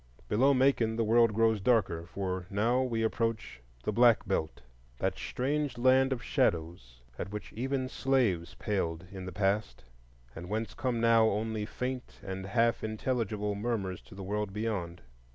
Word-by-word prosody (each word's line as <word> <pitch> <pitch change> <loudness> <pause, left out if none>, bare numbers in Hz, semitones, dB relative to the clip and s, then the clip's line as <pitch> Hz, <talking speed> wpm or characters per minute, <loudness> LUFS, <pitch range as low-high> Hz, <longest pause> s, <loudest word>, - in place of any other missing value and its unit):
Below 135 +6 +4
Macon 130 -4 +3
the 115 - +1
world 115 +1 +4
grows 110 -1 +2
darker; 95 -7 +1
for 95 0 -4
now 115 +5 +2
we 115 -3 -1
approach 115 - -2 0.2
the - - 0
Black 120 +1 +4
Belt,—that - - -3
strange 140 +1 -2
land 130 +2 +4
of 125 -2 -2
shadows, 85 - -1 0.2
at 95 - -3
which 105 0 -7
even 130 +2 -1
slaves 125 -11 0
paled 90 -4 -2
in 95 -2 -7
the - - -5
past, 95 - -1 0.5
and 85 +2 -8
whence 110 +1 -2
come 125 -3 -1
now 115 -1 +5
only 110 0 -2
faint 125 +1 -5
and 95 -1 -5
half 115 +3 +2
intelligible 110 -2 -1
murmurs 100 -4 -2
to - - -15
the 95 - -7
world 105 +1 -2
beyond. 95 -6 -3
110 Hz, 150 wpm, -30 LUFS, 95-120 Hz, 0.5 s, now